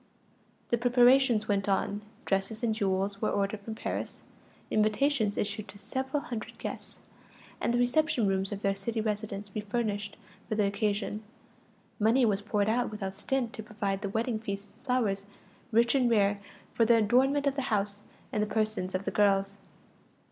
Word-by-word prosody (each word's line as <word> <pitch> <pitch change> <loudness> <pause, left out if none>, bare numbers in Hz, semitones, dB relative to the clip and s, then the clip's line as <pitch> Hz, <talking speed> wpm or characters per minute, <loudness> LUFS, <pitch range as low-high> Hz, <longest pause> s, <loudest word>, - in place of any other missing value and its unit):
The 235 - +2
preparations 245 -2 +5
went 200 -1 +1
on; 200 +1 0 0.2
dresses 195 +4 -1
and 225 -2 +2
jewels 195 -1 -1
were - - +2
ordered 200 +1 0
from 220 +2 -7
Paris, - - -4 0.5
invitations 215 +1 +2
issued 205 +1 -2
to - - -12
several 265 +7 -2
hundred 235 -8 -6
guests, - - -7 0.6
and - - +1
the 240 - +2
reception 245 0 +2
rooms 195 0 0
of 205 0 -5
their 195 - +3
city 220 +4 -3
residence 210 -2 -3
refurnished 210 -1 -2 0.3
for 215 - 0
the 210 -1 +2
occasion; 205 +1 -1 0.8
money 230 +4 +4
was 205 -2 +1
poured 205 -1 0
out 240 +3 +1
without 200 -3 -4
stint 240 +4 -1
to - - -6
provide 205 -2 -3
the 200 - -2
wedding 225 +2 -1
feasts 200 -2 -5
and - - -27
flowers, 205 -6 +1 0.4
rich 235 +1 +4
and 255 -3 +3
rare, 205 -3 +3 0.3
for 230 - +3
the 230 +1 +5
adornment 265 +6 +3
of 280 - +2
the 275 - -2
house, 205 -1 0 0.3
and 210 - 0
the 210 - +1
persons 215 -4 -1
of 185 +2 -2
the - - -1
girls. 200 -1 +2
215 Hz, 170 wpm, -30 LUFS, 200-235 Hz, 0.8 s, preparations